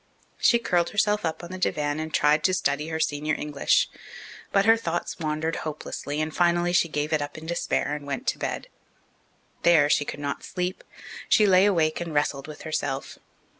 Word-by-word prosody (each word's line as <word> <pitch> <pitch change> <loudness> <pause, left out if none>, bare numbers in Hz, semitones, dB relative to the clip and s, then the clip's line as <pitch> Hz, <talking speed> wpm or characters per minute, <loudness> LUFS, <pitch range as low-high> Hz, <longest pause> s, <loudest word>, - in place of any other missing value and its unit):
She 235 - +5
curled 175 -7 +1
herself 210 0 +1
up 160 +1 -3
on 175 - -8
the 185 - -6
divan 150 -4 0
and 160 0 -4
tried 150 0 +3
to 185 - +3
study 150 -4 0
her 160 0 -3
senior 150 0 0
English. 150 -2 +1 0.6
But 195 0 +3
her 225 +1 +7
thoughts 175 -7 -3
wandered 155 0 -2
hopelessly, 150 -1 -5
and 155 0 -2
finally 175 0 +2
she 170 -2 +3
gave 150 +1 -2
it 155 - +2
up 145 +1 -5
in 155 - -9
despair 165 -3 -1
and 145 -1 -6
went 140 -2 -4
to - - -3
bed. - - -3 0.9
There 160 -4 +5
she - - +3
could 145 - -6
not 140 -1 -4
sleep; 180 +1 -4 0.5
she 215 - +5
lay 190 0 +5
awake 165 -5 +1
and 165 -3 -5
wrestled 145 -1 0
with 155 -1 -10
herself. 140 -4 -3
155 Hz, 190 wpm, -25 LUFS, 150-175 Hz, 0.9 s, her